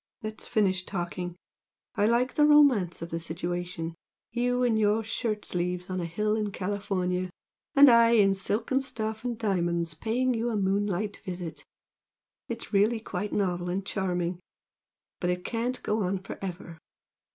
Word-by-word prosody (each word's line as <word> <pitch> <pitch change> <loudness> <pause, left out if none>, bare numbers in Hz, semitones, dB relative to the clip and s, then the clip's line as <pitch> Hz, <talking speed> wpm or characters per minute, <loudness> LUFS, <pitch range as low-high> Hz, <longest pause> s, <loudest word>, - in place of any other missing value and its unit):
let's 215 0 -5
finish 190 -3 +1
talking! 175 -1 -4 0.6
I 210 -3 +2
like 240 +3 +2
the 295 0 +5
romance 255 - +5
of 170 - -7
the 165 - -2
situation 170 0 -4 0.4
you 245 +1 +1
in 240 -2 +3
your 215 +1 +2
shirt 220 -1 -2
sleeves 180 +1 -2
on 185 - -1
a - - -2
hill 210 +6 0
in 210 -2 -1
California, 185 -2 -1 0.5
and 285 0 +9
I 235 -2 +7
in 200 -4 +5
silken 220 +7 0
stuff 220 -4 -4
and 245 -2 -2
diamonds 170 -6 0
paying 240 +10 0
you 235 +1 -1
a 220 - -1
moonlight 200 +1 0
visit 175 -3 -6 0.8
it's 230 -1 -6
really 215 +3 +3
quite 210 -1 -4
novel 180 -3 0
and 190 +2 -2
charming! 180 -3 -1 0.8
but 180 - 0
it 180 0 -2
can't 240 +2 -2
go 215 +1 0
on 190 0 0
for 190 - -8
ever! 175 -3 -6
200 Hz, 155 wpm, -28 LUFS, 180-225 Hz, 0.8 s, and